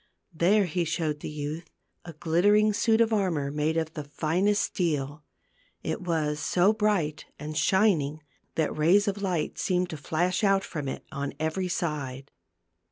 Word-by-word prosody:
There 195 +5 +3
he 175 +1 -1
showed 155 -2 -2
the - - -6
youth 150 +3 -5 0.4
a 170 - -8
glittering 205 +7 +3
suit 225 +1 +3
of 225 -1 +3
armor 170 -9 0
made 150 +2 0
of 160 -1 -1
the 150 - -5
finest 170 +8 +1
steel. 150 -5 -2 0.6
It - - -3
was 155 -4 -1
so 185 +7 +3
bright 205 -9 0
and 150 +1 -6
shining 155 -7 +2 0.3
that 160 -2 0
rays 180 +7 +4
of 200 0 -1
light 180 -6 -2
seemed 180 -1 0
to 160 - -5
flash 175 +6 -1
out 195 -1 +3
from 150 -4 -5
it - - -5
on 140 0 -4
every 160 +4 -1
side. 140 -6 -3
165 Hz, 160 wpm, -27 LUFS, 150-195 Hz, 0.6 s, rays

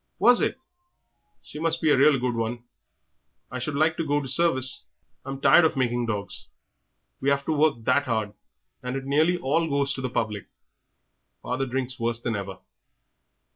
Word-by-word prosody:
"Was 240 +6 +5
it? - - 0 0.9
She 150 - -9
must 165 +1 +1
be 155 -2 +2
a - - +5
real 140 +1 +5
good 125 0 -1
'un. 115 +1 -3 0.9
I 125 - -4
should 140 +4 -3
like 155 +2 +2
to - - -1
go 145 -1 0
to 140 - -6
service; 130 -3 +1 0.4
I'm 135 0 -6
tired 165 - +6
of 160 - +1
making 120 -2 0
dogs; 100 -2 -4 0.7
we 135 - 0
have 140 0 0
to - - -1
work 155 0 +3
that 140 +4 +1
'ard, 110 -3 -1 0.5
and 125 +1 -4
it 135 0 -4
nearly 155 +6 +2
all 165 +1 0
goes 140 -1 0
to 135 - -6
the 130 - -2
public; 110 -5 -3 1.0
father 130 +2 -2
drinks 130 0 -3
worse 115 0 0
than 120 -1 -3
ever." 95 -2 -5
135 Hz, 175 wpm, -25 LUFS, 120-150 Hz, 1.0 s, tired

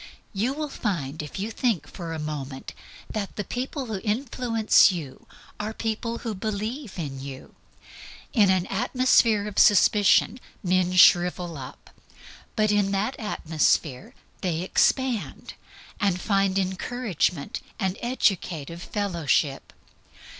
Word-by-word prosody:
You 225 +7 0
will 305 +1 -3
find, 165 - -3
if 150 - -8
you 210 +4 -3
think 220 - 0
for 170 -3 -7
a 165 - -3
moment, 145 -3 -6 0.3
that 205 -3 -5
the 205 - -3
people 260 +5 -4
who 215 -5 -4
influence 225 -2 +3
you 155 -8 -7 0.3
are 215 +1 -4
people 230 +1 -3
who 225 - -1
believe 215 +4 -4
in 140 -6 -5
you. 135 -1 -9 0.8
In 210 -6 +5
an 185 -1 +2
atmosphere 230 -1 +2
of 210 - -2
suspicion 205 +3 +5 0.2
men 185 -1 +2
shrivel 175 -1 +5
up; 135 -1 -10 0.6
but 215 -1 +2
in 205 -1 +2
that 210 +7 0
atmosphere 155 - 0 0.3
they 175 -3 -1
expand, 250 +4 0 0.5
and 200 -4 +1
find 195 -1 +1
encouragement 190 - -1 0.2
and 190 -1 0
educative 175 - -1
fellowship. 170 -9 -1
195 Hz, 120 wpm, -25 LUFS, 170-225 Hz, 0.8 s, In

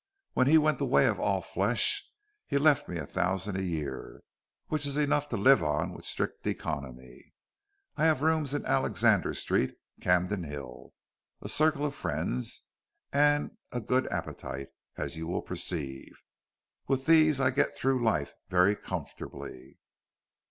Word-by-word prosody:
"When 130 - +3
he 160 +3 +7
went 155 0 +2
the - - 0
way - - +4
of - - +1
all - - +1
flesh - - +2 0.4
he 140 - +1
left 145 0 +3
me 85 - -3
a 80 - -4
thousand 95 +5 -1
a 95 - -1
year, 75 -7 -5 0.4
which 150 -2 -1
is 140 0 -2
enough 145 0 +1
to 115 - -2
live 130 +2 +6
on 75 -1 -1
with - - -9
strict - - -2
economy. 65 -4 -6 0.6
I 155 - +2
have 155 -3 +3
rooms 155 -3 +1
in 145 - -3
Alexander - - +2
Street, - - 0 0.3
Camden 90 +1 +1
Hill, 70 -5 -8 0.5
a - - -7
circle 155 -1 +3
of 145 - -2
friends, 60 +1 -3 0.5
and 145 +1 +3 0.2
a 125 - -2
good 125 +3 0
appetite, 70 0 -5 0.3
as 85 - -3
you 80 0 -5
will 90 - -2
perceive. 80 -7 -4 0.8
With 135 -1 0
these 155 -3 +5
I 130 -1 +3
get 140 - +1
through 130 -2 +1
life 85 -11 0 0.2
very 95 +3 +4
comfortably." 65 - -8
110 Hz, 150 wpm, -29 LUFS, -, 0.8 s, he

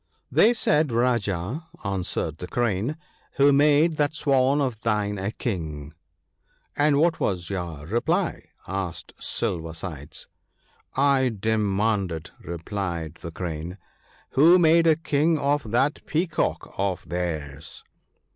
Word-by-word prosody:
'They 225 - +6
said, 155 - +2
Rajah,' 115 - 0 0.2
answered 90 -4 -2
the 90 - -6
Crane, 120 - -1 0.4
"who 140 +1 +5
made 150 +3 +4
that 150 0 +1
Swan 135 -1 +3
of 125 -6 -1
thine 105 -3 0
a 95 +1 -2
King? 80 - -4 0.3
" 75 - -50
' - - -41
And 145 0 +3
what 165 +2 +2
was 90 -2 -1
your 85 -6 -4
reply? 160 - 0
' - - -29
asked 95 -2 -4
Silver 85 -7 -2
sides. 80 -5 -7 0.4
' - - -36
I 135 -2 +3
demanded,' 100 -5 0
replied 85 -2 -4
the 85 - -6
Crane, 85 +1 -5 0.3
' - - -31
who 165 +7 +6
made 165 -1 +5
a 160 - +6
King 155 +1 +1
of 140 -4 0
that 130 +6 +1
Peacock 165 +1 -1
of 95 -2 -1
theirs. 80 -5 -4
110 Hz, 135 wpm, -25 LUFS, 85-145 Hz, 0.4 s, They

